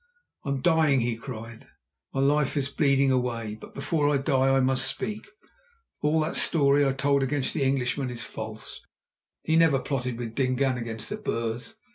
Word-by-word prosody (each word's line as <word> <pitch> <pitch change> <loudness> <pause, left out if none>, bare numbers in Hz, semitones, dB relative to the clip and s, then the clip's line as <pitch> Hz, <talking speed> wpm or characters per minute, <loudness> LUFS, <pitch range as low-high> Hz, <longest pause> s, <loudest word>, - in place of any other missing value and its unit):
"I - - -4
am 140 -1 -1
dying," 155 -5 +3
he 115 0 -1
cried; 115 -2 -9 0.4
"my 135 - -1
life 145 +1 +2
is 140 -1 0
bleeding 140 -2 +2
away, 120 -4 -1
but - - -12
before 150 -4 0
I 145 - +3
die 135 0 +2
I 135 0 +4
must 130 0 +2
speak. 210 - -4 0.7
All 150 +2 +2
that 155 +2 -2
story 145 -3 +4
I - - +2
told 140 +1 +1
against 135 0 0
the - - -2
Englishman 135 0 0
is 120 -1 -4
false. 110 0 -8 0.6
He 160 - +1
never 165 -4 +5
plotted 125 -3 -3
with 115 -2 -5
Dingaan 130 0 0
against 115 -1 -5
the 210 - -3
Boers. 120 - -4
135 Hz, 175 wpm, -26 LUFS, 125-145 Hz, 0.7 s, never